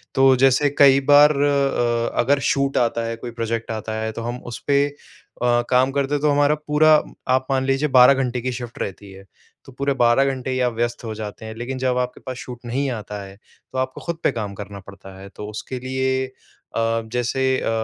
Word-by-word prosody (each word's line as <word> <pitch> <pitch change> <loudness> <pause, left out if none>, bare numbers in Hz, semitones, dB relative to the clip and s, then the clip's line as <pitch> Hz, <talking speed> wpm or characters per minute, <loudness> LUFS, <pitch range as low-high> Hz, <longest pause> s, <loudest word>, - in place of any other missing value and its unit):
तो 135 0 +5
जैसे 135 +2 +4
कई 135 -1 +7
बार 145 +1 +8
अ, 140 -5 +1
अगर 140 +3 +3
शूट 140 0 0
आता 115 -1 +1
है, 115 0 -3
कोई 120 +1 -8
प्रोजेक्ट 115 0 -3
आता 110 0 -4
है, 110 0 -2
तो 115 - -7
हम 120 +1 -4 0.2
उस - - -6
पे 140 0 +4
अ, 145 -3 -10 0.2
काम 130 +1 +3
करते 140 +1 0
हैं, 145 - 0
तो 150 - +2
हमारा 145 +1 +3
पूरा 155 +1 +5 0.4
आप 130 0 +2
मान 130 0 +1
लीजिए, 135 +3 +1
12 125 +3 +8
घंटे 125 0 -2
की 130 +1 -2
शिफ़्ट 120 -1 -7
रहती 100 0 -6
है। 95 0 -13 0.4
तो 135 - -12
पूरे 140 +2 -1
12 120 +3 +4
घंटे 130 0 -6
ही 130 - -1
आप 120 - -3
व्यस्त 120 +1 -2
हो 110 -1 -4
जाते 110 0 -7
हैं, 110 - -6
लेकिन 125 +3 -5
जब 130 -1 0
आपके 125 0 -2
पास 130 -1 -5
शूट 120 -1 -8
नहीं 135 +3 -1
आता 105 -3 -6
है, 95 0 -11 0.4
तो 130 - -6
आपको 130 0 -3
खुद 170 -1 -4
पे - - +3
काम 105 -2 -4
करना 100 -1 -7
पड़ता 95 0 -13
है। 100 - -10
तो 105 - -7
उसके 125 +4 -6
लिए 130 0 -1 0.5
अ, 115 0 +1
जैसे 125 +2 -1 0.2
अ, - - -2
125 Hz, 220 wpm, -21 LUFS, 115-135 Hz, 0.5 s, बार